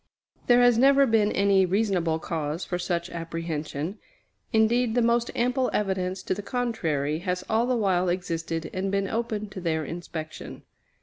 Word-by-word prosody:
There 245 Hz, 0 st, +6 dB
has 245 Hz, -2 st, +5 dB
never 275 Hz, +1 st, +6 dB
been 220 Hz, -4 st, +3 dB
any 195 Hz, -1 st, +3 dB
reasonable 185 Hz, -4 st, +1 dB
cause 160 Hz, 0 st, -3 dB
for 180 Hz, -, -3 dB
such 170 Hz, -1 st, -2 dB
apprehension. 165 Hz, +1 st, -4 dB, 0.5 s
Indeed, 225 Hz, +1 st, +2 dB
the 245 Hz, -, +3 dB
most 235 Hz, 0 st, +2 dB
ample 250 Hz, +2 st, +1 dB
evidence 190 Hz, -2 st, -1 dB
to -, -, -1 dB
the 200 Hz, -, -5 dB
contrary 165 Hz, -, -1 dB
has 180 Hz, 0 st, -2 dB
all 225 Hz, +2 st, +1 dB
the 250 Hz, -1 st, +1 dB
while 185 Hz, -4 st, +1 dB
existed 165 Hz, -2 st, -3 dB
and 190 Hz, +1 st, -2 dB
been 195 Hz, 0 st, 0 dB
open 220 Hz, -1 st, -2 dB
to 190 Hz, -, -8 dB
their 160 Hz, -2 st, -1 dB
inspection. 160 Hz, -1 st, -7 dB
190 Hz, 160 wpm, -26 LUFS, 165-225 Hz, 0.5 s, There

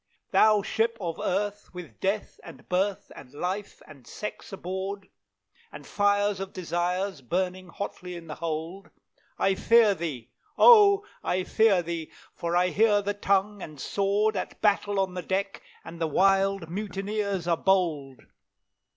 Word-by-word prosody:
"Thou 215 Hz, -2 st, +5 dB
Ship 230 Hz, +3 st, 0 dB
of 170 Hz, -4 st, -4 dB
Earth, 205 Hz, +2 st, -2 dB
with 180 Hz, -2 st, -10 dB
Death, 200 Hz, +2 st, -2 dB
and -, -, -13 dB
Birth, 190 Hz, +2 st, -1 dB
and 125 Hz, -, -12 dB
Life, 190 Hz, +6 st, -4 dB
and 140 Hz, -6 st, -16 dB
Sex 210 Hz, -, -7 dB
aboard, 190 Hz, +1 st, -5 dB, 0.6 s
And 150 Hz, -1 st, -11 dB
fires 205 Hz, +1 st, +1 dB
of 195 Hz, 0 st, -6 dB
Desires 180 Hz, 0 st, -2 dB
burning 185 Hz, +6 st, -2 dB
hotly 180 Hz, 0 st, -6 dB
in 170 Hz, -1 st, -9 dB
the 155 Hz, -, -7 dB
hold, 165 Hz, +4 st, -5 dB, 0.5 s
I 195 Hz, -, +2 dB
fear 225 Hz, +1 st, +4 dB
thee, 150 Hz, -10 st, -6 dB, 0.3 s
O! 415 Hz, -3 st, +7 dB, 0.2 s
I 185 Hz, +1 st, 0 dB
fear 205 Hz, -3 st, +3 dB
thee, 165 Hz, -1 st, -5 dB, 0.2 s
for 170 Hz, 0 st, -3 dB
I 180 Hz, +1 st, +3 dB
hear 205 Hz, +1 st, +3 dB
the 205 Hz, +1 st, -1 dB
tongue 200 Hz, 0 st, 0 dB
and 155 Hz, -4 st, -9 dB
sword 200 Hz, +7 st, 0 dB
At 185 Hz, -, -5 dB
battle 205 Hz, -1 st, +1 dB
on 190 Hz, -1 st, 0 dB
the 180 Hz, -, -4 dB
deck, 195 Hz, +2 st, -2 dB, 0.2 s
and 170 Hz, 0 st, -10 dB
the 165 Hz, -, +1 dB
wild 195 Hz, +2 st, +2 dB
mutineers 200 Hz, 0 st, -3 dB
are 170 Hz, -, +3 dB
bold! 160 Hz, -8 st, 0 dB
190 Hz, 150 wpm, -27 LUFS, 170-205 Hz, 0.6 s, O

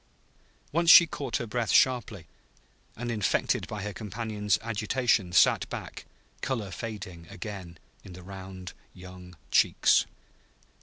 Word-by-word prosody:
Once 170 Hz, +2 st, +1 dB
she 170 Hz, -, +10 dB
caught 140 Hz, -6 st, -4 dB
her 120 Hz, -, -4 dB
breath 115 Hz, 0 st, -2 dB
sharply, 120 Hz, -9 st, +2 dB, 0.7 s
and, 120 Hz, +1 st, -4 dB
infected 105 Hz, -4 st, 0 dB
by 105 Hz, -2 st, -6 dB
her 105 Hz, 0 st, -5 dB
companion's 105 Hz, 0 st, -2 dB
agitation, 110 Hz, -3 st, 0 dB
sat -, -, +4 dB
back, -, -, -7 dB, 0.4 s
color 110 Hz, -7 st, -3 dB
fading 95 Hz, -8 st, -7 dB
again 90 Hz, -3 st, -8 dB, 0.3 s
in 95 Hz, -, -11 dB
the 90 Hz, 0 st, -11 dB
round 95 Hz, -1 st, -9 dB, 0.2 s
young 90 Hz, -1 st, -12 dB
cheeks. -, -, +3 dB
105 Hz, 120 wpm, -28 LUFS, 90-115 Hz, 0.7 s, she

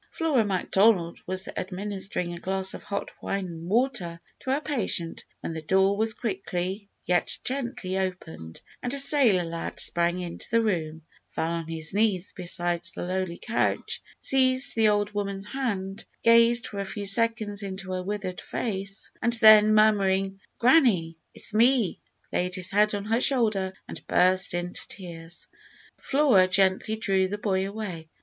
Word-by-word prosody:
Flora 305 Hz, -8 st, +1 dB
Macdonald 190 Hz, -2 st, +2 dB
was 185 Hz, +1 st, -2 dB
administering 190 Hz, -2 st, -4 dB
a 170 Hz, -, -7 dB
glass 190 Hz, +1 st, -1 dB
of -, -, -8 dB
hot 200 Hz, 0 st, -4 dB
wine 195 Hz, -1 st, -2 dB
and 170 Hz, -1 st, -8 dB
water 215 Hz, -7 st, 0 dB, 0.2 s
to -, -, -7 dB
her 270 Hz, +2 st, +2 dB
patient, 230 Hz, -, -2 dB, 0.2 s
when -, -, -4 dB
the 160 Hz, -, -5 dB
door 190 Hz, +5 st, +2 dB
was 220 Hz, +2 st, +1 dB
quickly, 195 Hz, -2 st, -4 dB, 0.2 s
yet 180 Hz, 0 st, +1 dB
gently, 245 Hz, -8 st, -3 dB
opened, 165 Hz, -, -6 dB, 0.2 s
and 245 Hz, +2 st, -3 dB
a -, -, -1 dB
sailor 270 Hz, -10 st, +4 dB
lad 165 Hz, 0 st, -5 dB
sprang 175 Hz, +1 st, +2 dB
into 175 Hz, -2 st, -6 dB
the 230 Hz, 0 st, +2 dB
room, 160 Hz, -6 st, -2 dB, 0.3 s
fell 165 Hz, -, -2 dB
on 165 Hz, -1 st, -3 dB
his 160 Hz, 0 st, -4 dB
knees 200 Hz, -3 st, +1 dB
beside 175 Hz, -1 st, -2 dB
the -, -, -4 dB
lowly 185 Hz, -1 st, -2 dB
couch, 235 Hz, -, -1 dB, 0.2 s
seized 260 Hz, 0 st, +2 dB
the 220 Hz, -2 st, +4 dB
old 205 Hz, 0 st, +1 dB
woman's 200 Hz, -1 st, -3 dB
hand, 205 Hz, -5 st, -3 dB, 0.2 s
gazed 230 Hz, +1 st, +5 dB
for 200 Hz, -, -6 dB
a -, -, -1 dB
few 200 Hz, +1 st, -5 dB
seconds 215 Hz, 0 st, +1 dB
into 190 Hz, -1 st, -6 dB
her 185 Hz, 0 st, -2 dB
withered 190 Hz, -1 st, -4 dB
face, 195 Hz, -2 st, -4 dB
and 235 Hz, +1 st, +1 dB
then 215 Hz, -2 st, +7 dB
murmuring, 195 Hz, -2 st, +3 dB, 0.2 s
"Granny, 235 Hz, -, +4 dB, 0.2 s
it's -, -, -2 dB
me," 235 Hz, -2 st, +3 dB, 0.3 s
laid 180 Hz, +1 st, -1 dB
his 185 Hz, -1 st, 0 dB
head 210 Hz, +1 st, +3 dB
on 200 Hz, 0 st, -4 dB
her 225 Hz, +3 st, +1 dB
shoulder 215 Hz, -9 st, +2 dB, 0.2 s
and -, -, -10 dB
burst 185 Hz, 0 st, +3 dB
into 175 Hz, 0 st, -4 dB
tears. 170 Hz, -2 st, -8 dB, 0.5 s
Flora 270 Hz, -10 st, +4 dB
gently 190 Hz, +3 st, +2 dB
drew 195 Hz, -3 st, +1 dB
the 205 Hz, +2 st, -4 dB
boy 195 Hz, -2 st, 0 dB
away. 190 Hz, -7 st, -6 dB
195 Hz, 155 wpm, -26 LUFS, 180-220 Hz, 0.5 s, then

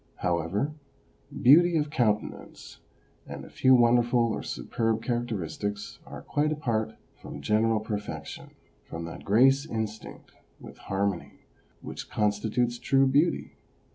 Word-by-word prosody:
However, 90 Hz, -, -1 dB, 0.7 s
beauty 170 Hz, +6 st, +7 dB
of 150 Hz, -1 st, -1 dB
countenance 110 Hz, -7 st, -2 dB, 0.5 s
and -, -, -8 dB
a -, -, -14 dB
few 130 Hz, 0 st, +5 dB
wonderful 120 Hz, -1 st, +3 dB
or -, -, -3 dB
superb 115 Hz, -1 st, -2 dB
characteristics 105 Hz, -4 st, -3 dB
are -, -, -9 dB
quite 150 Hz, +1 st, 0 dB
apart 120 Hz, -8 st, -1 dB, 0.3 s
from 70 Hz, -, -8 dB
general 110 Hz, +8 st, +2 dB
per 105 Hz, -1 st, -3 dB
fection, 105 Hz, -, -8 dB, 0.3 s
from 85 Hz, 0 st, -7 dB
that 85 Hz, -, -8 dB
grace 135 Hz, +6 st, +4 dB
instinct 110 Hz, -5 st, -6 dB, 0.3 s
with -, -, -12 dB
harmony 95 Hz, -2 st, -3 dB, 0.4 s
which -, -, -8 dB
con 105 Hz, -1 st, +2 dB
stitutes 120 Hz, +3 st, -2 dB
true 135 Hz, 0 st, +3 dB
beauty. 145 Hz, +6 st, +1 dB
115 Hz, 125 wpm, -27 LUFS, 105-130 Hz, 0.7 s, beauty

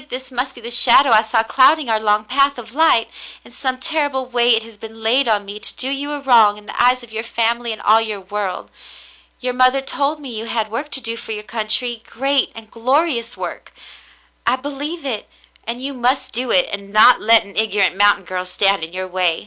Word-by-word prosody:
This 260 Hz, +1 st, -6 dB
must 255 Hz, +2 st, -2 dB
be 240 Hz, -, -12 dB
the 235 Hz, +1 st, -7 dB
shadow 245 Hz, +2 st, +6 dB
I 215 Hz, -1 st, +6 dB
saw 225 Hz, 0 st, 0 dB
clouding 270 Hz, +5 st, +3 dB
our 220 Hz, -1 st, +1 dB
long 210 Hz, 0 st, +1 dB
path 275 Hz, +3 st, +1 dB
of 230 Hz, -1 st, -10 dB
light. 300 Hz, -7 st, +3 dB, 0.4 s
In -, -, -16 dB
some 260 Hz, 0 st, -2 dB
terrible 285 Hz, -1 st, -1 dB
way 240 Hz, -1 st, +3 dB
it 225 Hz, -, -2 dB
has 225 Hz, -1 st, -14 dB
been 225 Hz, +1 st, -12 dB
laid 250 Hz, +4 st, +2 dB
on 210 Hz, -2 st, +1 dB
me 200 Hz, +1 st, -8 dB
to -, -, -4 dB
do 260 Hz, -, -2 dB
you 285 Hz, +2 st, -3 dB
a 290 Hz, -, -4 dB
wrong 230 Hz, -6 st, +4 dB
in 210 Hz, -, -15 dB
the -, -, -3 dB
eyes 250 Hz, 0 st, +3 dB
of 235 Hz, -, -14 dB
your 220 Hz, -, -3 dB
family 235 Hz, 0 st, 0 dB
and 220 Hz, -, -6 dB
all 220 Hz, +2 st, +4 dB
your 215 Hz, -3 st, -3 dB
world. 195 Hz, -1 st, -5 dB, 0.7 s
Your 250 Hz, 0 st, -2 dB
mother 255 Hz, +2 st, +3 dB
told 280 Hz, +3 st, -2 dB
me 275 Hz, -4 st, -9 dB
you 220 Hz, +1 st, -5 dB
had 220 Hz, -2 st, -3 dB
work 280 Hz, +6 st, -4 dB
to 265 Hz, -, +1 dB
do 230 Hz, 0 st, -3 dB
for 225 Hz, -, -7 dB
your 210 Hz, 0 st, -7 dB
country, 225 Hz, +2 st, -1 dB
great 275 Hz, +2 st, 0 dB
and 225 Hz, -1 st, -12 dB
glorious 250 Hz, 0 st, -1 dB
work. -, -, -8 dB, 0.7 s
I 240 Hz, -, +3 dB
believe 285 Hz, +4 st, -7 dB
it, 230 Hz, -6 st, -4 dB, 0.4 s
and 235 Hz, +1 st, -4 dB
you 275 Hz, +2 st, -5 dB
must 255 Hz, +1 st, -1 dB
do 250 Hz, +2 st, -2 dB
it 270 Hz, +2 st, +3 dB
and 200 Hz, 0 st, -7 dB
not 215 Hz, +4 st, +6 dB
let 225 Hz, 0 st, +4 dB
an 200 Hz, -, -15 dB
ignorant 205 Hz, -3 st, +1 dB
mountain 205 Hz, -1 st, +3 dB
girl 185 Hz, 0 st, -5 dB
stand 195 Hz, -1 st, +1 dB
in 165 Hz, +2 st, -7 dB
your 185 Hz, 0 st, -5 dB
way. 180 Hz, -2 st, 0 dB
235 Hz, 225 wpm, -18 LUFS, 215-265 Hz, 0.7 s, shadow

